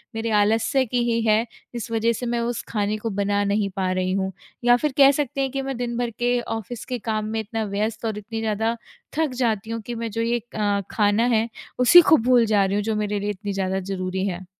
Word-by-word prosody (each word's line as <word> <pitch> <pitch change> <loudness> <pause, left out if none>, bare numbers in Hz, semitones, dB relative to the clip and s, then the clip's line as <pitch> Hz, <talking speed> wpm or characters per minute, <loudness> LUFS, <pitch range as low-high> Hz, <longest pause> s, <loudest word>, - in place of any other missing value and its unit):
मेरे 225 0 -2
आलस्य 225 +6 +2
की 245 +1 0
ही 230 0 +1
है 215 +2 +3 0.3
इस 235 0 -5
वजह 230 +1 +2
से 245 - -5
मैं 240 0 -1
उस 235 0 -2
खाने 210 -1 -1
को 225 +1 -4
बना 205 0 0
नहीं 200 0 0
पा 185 -2 0
रही 185 0 0
हूँ। 190 0 -1 0.3
या 245 0 +6
फिर 300 +2 -1
कह 275 -1 +8
सकते 280 -1 -2
हैं 265 -1 -1
कि 275 0 -2
मैं 270 -2 -4
दिन 240 -1 -3
भर 240 -1 -1
के 245 0 +2
ऑफिस 225 +1 -5
के 250 -2 -4
काम 215 -1 0
में 220 +1 -2
इतना 220 +1 -3
व्यस्त 215 +3 -2
और 215 -2 -2
इतनी 225 +2 -5
ज़्यादा 220 +1 0 0.4
थक 320 -3 +2
जाती 220 -4 -1
हूँ 230 -1 -3
कि 240 - -5
मैं 230 0 -3
जो 230 +2 -2
ये 235 +1 +1 0.2
अ, 205 -1 +1
खाना 210 +1 +2
है 220 +1 +2 0.3
उसी 350 +8 +9
को 315 - +8
भूल 240 0 +4
जा 205 -2 +3
रही 195 - -1
हूँ 205 - 0
जो 220 0 -1
मेरे 210 -1 -1
लिए 205 +1 -2
इतनी 205 0 -4
ज़्यादा 190 0 -1
ज़रूरी 190 0 -3
है। 180 0 -5
220 Hz, 245 wpm, -23 LUFS, 205-240 Hz, 0.4 s, उसी